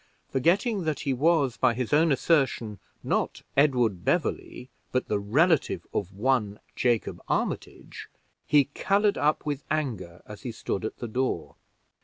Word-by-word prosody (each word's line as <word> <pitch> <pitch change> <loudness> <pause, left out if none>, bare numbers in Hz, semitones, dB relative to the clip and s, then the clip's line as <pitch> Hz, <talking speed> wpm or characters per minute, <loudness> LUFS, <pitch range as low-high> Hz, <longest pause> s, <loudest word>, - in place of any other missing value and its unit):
Forgetting 190 - +2
that 155 -3 -1
he 140 -3 0
was, 140 -2 +2
by 125 -3 +2
his 125 +2 -2
own 160 +2 +4
assertion, 130 - +1 0.2
not - - -1
Edward 125 -10 +2
Beverley, 125 +9 -2 0.2
but 130 - 0
the 105 - +1
relative 150 - +2
of 95 -2 -2
one 105 -1 0 0.2
Jacob 120 -3 0
Armitage, - - -3 0.4
he 145 -2 +5
colored 200 +8 +1
up 150 +1 +1
with 145 -2 -3
anger 110 - -3
as 105 -1 -10
he 125 - -5
stood 110 -2 -4
at - - -5
the 120 - -5
door. 130 +4 -2
130 Hz, 145 wpm, -27 LUFS, 110-150 Hz, 0.4 s, he